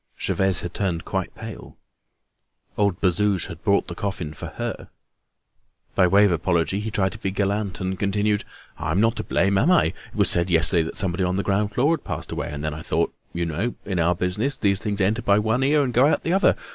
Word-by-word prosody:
Gervaise 95 -1 +1
had 90 - -6
turned 90 -5 -2
quite - - -3
pale. - - -9 1.0
Old 100 -4 +1
Bazouge 95 0 +2
had 85 0 -9
brought 100 -2 +2
the - - -5
coffin 95 -7 -4
for 75 - -7
her. - - -5 1.0
By 90 - +4
way 100 +3 +5
of 100 - +3
apology, 85 +3 0
he 105 +1 -3
tried 95 -3 0
to 110 - -9
be 95 - -2
gallant, 100 -1 -1
and 95 -1 -3
continued: 105 +1 +1 0.4
"I'm 80 +4 0
not 115 +2 +3
to 110 - -2
blame, 95 +2 +2
am 155 - +3
I? 180 - +5 0.2
It - - -20
was - - +3
said 85 +1 +1
yesterday 85 +1 +3
that 80 +1 -4
someone 95 -1 +2
on 90 0 0
the 100 - 0
ground 100 +2 0
floor 145 +6 +3
had 160 - -3
passed - - -5
away. - - -3
Then 75 +1 -3
I 75 - -7
thought—you 85 +1 -2
know, 85 +10 -2
in 95 -3 -2
our 85 +1 +2
business, 105 +11 -1
these 100 -2 +1
things 105 -2 -2
enter 105 +5 +1
by 100 -3 +3
one 110 +4 +1
ear 145 +2 +3
and 125 -3 -2
go 125 +4 +5
out 155 - +1
by - - -2
the - - +2
other. 195 - +4
100 Hz, 220 wpm, -23 LUFS, 90-105 Hz, 1.0 s, way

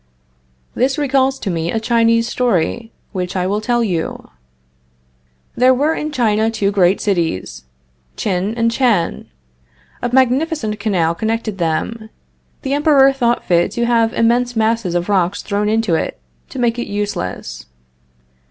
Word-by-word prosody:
This 265 +4 0
recalls 270 -2 +1
to 195 - -3
me 165 0 -2
a 225 - -1
Chinese 230 0 +2
story, 230 -1 -1 0.2
which 180 -2 -4
I 180 -1 0
will 205 +3 -1
tell 240 +1 +1
you. 175 -7 -3 1.2
There 255 +1 +4
were 295 +5 +1
in 305 -1 -4
China 220 -5 +1
two 210 -3 0
great 190 -1 +3
cities, 165 - -2 0.5
Tchin 195 +2 -1
and 230 0 +2
Tchan. 230 -9 0 0.7
A 245 - -1
magnificent 260 -3 +1
canal 180 -6 +1
connected 220 +1 -3
them. 220 +7 -2 0.5
The 270 -1 -1
Emperor 285 -2 +4
thought 240 -3 0
fit 175 -1 +2
to 235 - 0
have 230 -1 +2
immense 240 +1 +1
masses 220 -5 0
of 175 0 -1
rock 190 -2 +1
thrown 210 0 -1
into 220 -4 +1
it, 160 - -2 0.3
to - - -9
make 240 -1 0
it 240 - -3
useless. 200 - -4
225 Hz, 145 wpm, -17 LUFS, 190-245 Hz, 1.2 s, There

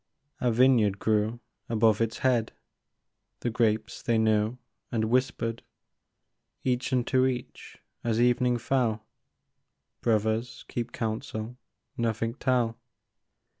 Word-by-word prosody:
A 125 - +2
vineyard 115 -4 +4
grew 110 +3 0 0.3
above 110 -1 +3
its 115 0 0
head; 120 -4 +2 0.9
The 120 - -1
grapes 110 -2 0
they 115 -1 +1
knew, 110 +1 +2 0.3
and 110 -1 0
whispered 120 -2 0 1.0
Each 125 0 0
unto 130 +1 +2
each, 125 -1 -5 0.3
as 115 -1 0
evening 125 0 +3
fell: 115 -4 0 1.0
Brothers, 110 +2 0
keep 120 0 -4
counsel, 110 +1 -4 0.4
nothing 115 0 -1
tell 125 -4 0
115 Hz, 100 wpm, -28 LUFS, 110-125 Hz, 1.0 s, vineyard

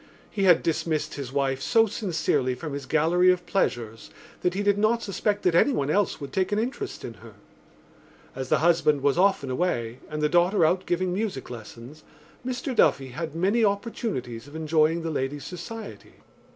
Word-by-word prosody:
He 200 -2 0
had 180 -3 +5
dismissed 160 -1 -1
his 135 -3 -6
wife 135 -1 0
so 225 +10 +4
sincerely 160 - -1
from 150 +3 -6
his 140 -1 -6
gallery 170 +5 +4
of 180 -1 -2
pleasures 115 - -2 0.3
that 180 0 0
he 205 - -1
did 205 0 +2
not 230 +2 +2
suspect 205 +1 -1
that 180 - +3
anyone 165 - +2
else 200 +2 +1
would 140 -2 -8
take 190 +1 0
an 205 - +1
interest 260 - -3
in - - -6
her. - - -13 1.0
As 130 -1 -5
the - - +4
husband 160 -4 +3
was 140 +3 +2
often 185 -9 +2
away 125 -6 -1
and 150 0 -3
the - - +4
daughter 175 +3 +3
out 180 +3 +1
giving 180 +1 0
music 195 - -3
lessons 120 +5 -10 0.4
Mr 255 +1 -3
Duffy 135 -10 +3
had 155 +4 -5
many 200 +7 +2
opportunities 200 - -2
of 145 - -13
enjoying 160 +1 +1
the 165 - -2
lady's 140 0 -3
society. 220 +6 -8
165 Hz, 180 wpm, -26 LUFS, 140-200 Hz, 1.0 s, had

